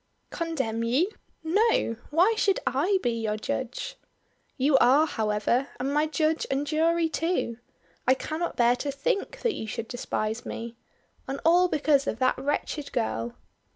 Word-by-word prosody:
"Condemn 265 -10 -2
you! 275 - +2 0.3
No! 355 - +2
Why 355 +9 +4
should 400 -3 +2
I 335 +10 +2
be 240 - +2
your 220 -2 -2
judge?" 260 - -4 0.6
"You 275 +1 +3
are, 275 +6 +5
however 220 +1 0
and 270 +3 -1
my 300 +1 +2
judge 315 0 0
and 275 +2 0
jury 325 +2 +2
too. 320 -8 -1 0.5
I 260 - +6
cannot 315 +5 -3
bear 240 0 +4
to 280 +3 -2
think 350 - -2
that 470 -3 +1
you 220 - -5
should 230 +1 -4
despise 225 -2 -3
me. 230 +1 -6 0.5
And 270 +1 -3
all 350 +2 +6
because 290 -4 +2
of - - -1
that 255 +1 +2
wretched 290 +1 -2
girl." 115 +2 -2
280 Hz, 155 wpm, -27 LUFS, 235-325 Hz, 0.6 s, I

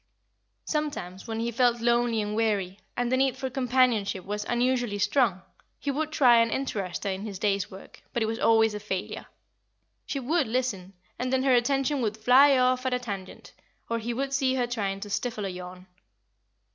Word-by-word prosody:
Sometimes, 285 - -3
when 225 0 -3
he 235 +1 -1
felt 240 0 +2
lonely 235 -1 +2
and 210 0 -3
weary, 205 -4 0 0.2
and 245 0 0
the 260 - +3
need 265 -1 +1
for 265 -1 -4
companionship 245 -7 +1
was 205 +1 -3
unusually 245 -3 0
strong, 200 -3 +1 0.3
he 285 - -2
would 310 +3 -2
try 245 -6 +5
and 230 0 +3
interest 200 -10 -3
her 200 - -1
in 190 0 -4
his 205 -2 -6
day's 200 -1 0
work; 190 - -13
but 235 - 0
it - - +1
was 225 +1 -3
always 225 -1 +4
a 210 - -4
failure. 190 -3 -5 0.8
She 280 - -2
would 295 +3 +1
listen, 220 -6 -2 0.3
and 255 0 -2
then 260 0 +2
her 265 -1 +4
attention 270 +3 +2
would 215 -2 -1
fly 260 +5 +6
off 255 0 +2
at 255 - +1
a - - -1
tangent, 200 -6 -7 0.4
or 230 - +1
he 230 +2 -3
would 270 +3 -2
see 265 -1 +2
her 250 -2 +1
trying 200 -5 -3
to 205 - -6
stifle 220 -2 -2
a - - -2
yawn. 180 0 -9
235 Hz, 195 wpm, -27 LUFS, 205-255 Hz, 0.8 s, fly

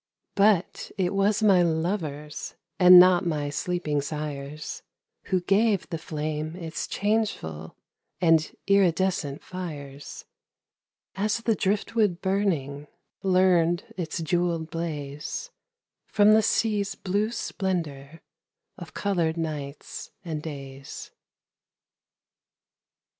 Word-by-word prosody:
But 200 -3 +2
it 185 -1 0
was 200 +2 +2
my 195 -4 +6
lovers, 160 -3 -2 0.2
And 180 -1 +10
not 180 0 +6
my 150 -4 -1
sleeping 155 -2 -1
sires, 150 0 -5 0.4
Who 185 -2 +1
gave 200 +1 +2
the 165 - -3
flame 155 0 -4
its 165 -3 -5
changeful 200 - -2 0.4
And 165 -2 +3
iridescent 185 -6 +2
fires; 145 -7 -7 0.9
As 210 +3 0
the 230 -1 +1
driftwood 205 -1 0
burning 165 -8 -1 0.3
Learned 185 +2 +2
its 165 -1 -3
jewelled 170 -1 0
blaze 155 - -5 0.6
From 210 0 +5
the 220 - +6
sea's 210 -2 +1
blue 205 +3 -1
splendor 165 -9 -4 0.6
Of 175 -3 -10
colored 170 -5 0
nights 150 -3 -5 0.2
and 155 -3 -3
days. 140 -3 -8
175 Hz, 95 wpm, -26 LUFS, 150-195 Hz, 0.9 s, And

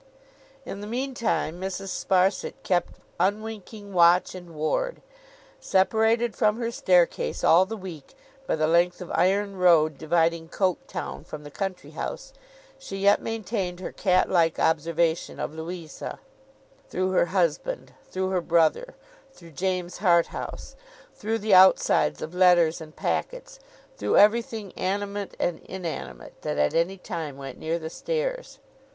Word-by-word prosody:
In 200 - -6
the 205 - -6
meantime, 235 - -2
Mrs. 195 +1 -4
Sparsit 190 +1 +1
kept 175 -2 0 0.2
unwinking 205 +1 -3
watch 175 0 +5
and 175 -3 -10
ward. - - -1 0.6
Separated 220 +4 +2
from 210 +1 +2
her 235 -1 -2
staircase, 180 -6 +1
all 180 +3 +6
the 225 +2 -5
week, 175 -7 -10 0.3
by - - +1
the 155 -1 +1
length 170 +2 +2
of 180 - -8
iron 200 +1 +1
road 160 -5 +4
dividing 165 0 +1
Coketown 185 -1 -2
from 150 -1 -9
the 145 - -10
country 195 +1 -5
house, - - -6 0.5
she 195 -7 -7
yet 200 +1 +4
maintained 205 -5 -3
her 185 - -5
cat 185 -2 +2
like 165 -3 +2
observation 165 +1 0
of - - -3
Louisa, 160 -1 -7 0.7
through 185 +1 -1
her 180 -2 +3
husband, 185 - -1 0.2
through 185 0 -2
her 185 -2 +1
brother, 170 - +1 0.4
through 170 -10 -15
James 180 +2 -2
Harthouse, 175 - 0 0.4
through 220 +2 -2
the 215 -1 0
outsides 190 0 +5
of 160 - -6
letters 175 -3 +4
and 155 -1 -11
packets, - - -3 0.4
through - - +1
everything 215 -1 +3
animate 200 +1 -3
and 175 -2 -1
inanimate 165 - -7
that - - -3
at 75 0 +2
any 175 +4 +1
time 155 -6 -6
went 135 -2 -8
near 160 +1 -1
the 160 -1 -7
stairs. - - -3
185 Hz, 140 wpm, -26 LUFS, 170-205 Hz, 0.7 s, all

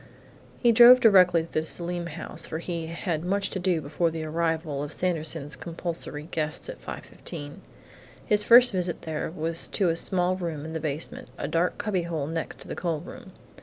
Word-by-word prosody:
He 240 - +4
drove 240 +2 +9
directly 180 -7 +5
to 165 - -13
the 155 - 0
Selim 170 +2 -1
house, 170 0 -5
for 160 - -4
he 170 -1 -4
had 170 -1 -3
much 195 +2 -1
to 190 - -3
do 180 -3 0
before 150 +4 0
the 160 0 -5
arrival 160 -2 -2
of 145 +1 -5
Sanderson's 160 -5 -1
compulsory 165 -3 -5
guests 155 - -2
at - - -8
5:15. 145 -4 -8 0.7
His 210 0 +2
first 245 +2 +7
visit 180 -3 -2
there 155 -1 -3
was 165 0 0
to 190 -4 0
a 165 - +1
small 180 +1 +2
room 165 -5 -4
in 160 - -6
the 160 - -2
basement 150 0 -4
a - - -3
dark 165 +3 0
cubbyhole 170 -7 -2
next 165 +1 -4
to - - -9
the - - -5
coal 165 -4 -2
room. - - -11
170 Hz, 185 wpm, -26 LUFS, 160-180 Hz, 0.7 s, drove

